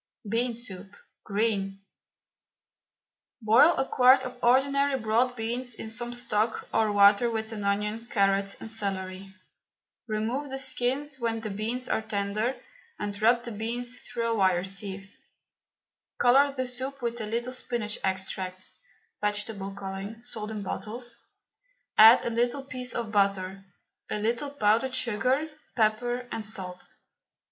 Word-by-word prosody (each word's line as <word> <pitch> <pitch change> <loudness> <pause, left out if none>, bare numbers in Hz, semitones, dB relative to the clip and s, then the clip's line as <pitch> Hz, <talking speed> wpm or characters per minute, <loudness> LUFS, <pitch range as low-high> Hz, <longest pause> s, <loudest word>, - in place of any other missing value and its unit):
BEAN 235 +3 0
SOUP, 200 -5 -4 0.4
GREEN. 200 -2 0 1.6
Boil 230 +9 +6
a 270 - +2
quart 260 +1 +6
of 250 -1 -7
ordinary 275 +3 +3
broad 235 +3 +1
beans 240 +1 -3
in 220 0 -6
some 240 +1 -4
stock 230 -2 -1
or 220 -1 +3
water 205 +3 +6
with 220 -1 -3
an 210 -2 -5
onion, 210 +3 -1
carrot 195 -1 +2
and 225 - -7
celery. 195 -3 -4 0.8
Remove 230 +6 -2
the 265 - -3
skins 265 +2 -1
when 230 -1 -1
the 215 -2 -4
beans 230 +5 -2
are - - 0
tender 215 +3 -1 0.4
and 205 0 -5
rub 235 +2 +4
the 240 - -5
beans 240 +3 -3
through 235 -1 -4
a 230 - +1
wire 185 -4 +3
sieve. 195 0 -4 1.1
Colour 275 +4 +5
the 260 -2 -3
soup 260 +2 -4
with 235 0 -2
a 215 - -3
little 235 +3 -2
spinach 235 -4 -2
extract 190 -1 -3 0.5
(vegetable 205 -1 -2
colouring, 195 +3 -6
sold 220 -3 -4
in 215 -2 -4
bottles) 235 +4 -5 0.8
add 225 +3 +9
a 235 - 0
little 240 +4 0
piece 255 -2 -6
of 230 -2 -3
butter, 195 -2 +1 0.5
a - - -1
little 230 +6 -1
powdered 250 0 +2
sugar, 255 +7 +1 0.3
pepper 240 +2 +1
and 225 - -3
salt. 190 -4 -7
225 Hz, 135 wpm, -28 LUFS, 205-245 Hz, 1.6 s, add